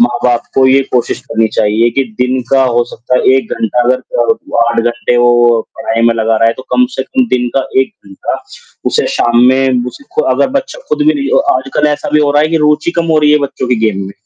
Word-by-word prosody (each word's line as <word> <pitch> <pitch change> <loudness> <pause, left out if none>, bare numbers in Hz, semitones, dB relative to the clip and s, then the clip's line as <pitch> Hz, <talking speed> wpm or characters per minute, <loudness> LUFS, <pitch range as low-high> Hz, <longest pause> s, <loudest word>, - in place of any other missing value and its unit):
माँ-बाप 120 0 +1
को 135 -1 +4
ये 135 +1 +4
कोशिश 125 -2 -1
करनी 110 0 0
चाहिए 110 +3 +1
कि 135 - +2 0.2
दिन 125 +1 +1
का 135 -1 +4
हो 120 -1 +1
सकता 120 +2 -3
है 130 - +3
1 130 -4 -1
घंटा 115 +2 0
अगर 125 - +3
अ, 455 - -2
8 120 - 0
घंटे 120 +1 -1
वो 120 -1 +3 0.2
पढ़ाई 115 -4 -2
में 115 - +3
लगा 110 0 0
रहा 115 - +2
है, 115 - +1
तो 130 - -10
कम 250 0 +3
से - - -1
कम 260 -2 -1
दिन 125 -6 0
का 135 - 0
1 130 - -2
घंटा 95 - -5 0.5
उसे - - +1
शाम 120 0 +1
में, 130 -1 +2
उसे 285 - -9
खु 465 - +1
अगर - - +1
बच्चा - - -8
खुद 450 -10 0
भी 310 - +4
नहीं 280 -1 -2
अ, 270 - +2
आजकल 135 +3 -1
ऐसा 150 - -3
भी 150 - +4
हो 145 -1 +2
रहा 145 +1 +3
है 155 - +1
कि 165 - 0
रुचि 150 +3 +1
कम 170 0 0
हो 155 - +3
रही 150 0 +3
है 150 - +4
बच्चों 140 -3 -4
के 125 - +2
गेम 100 -3 -1
में 100 - -9
125 Hz, 250 wpm, -12 LUFS, 120-150 Hz, 0.5 s, को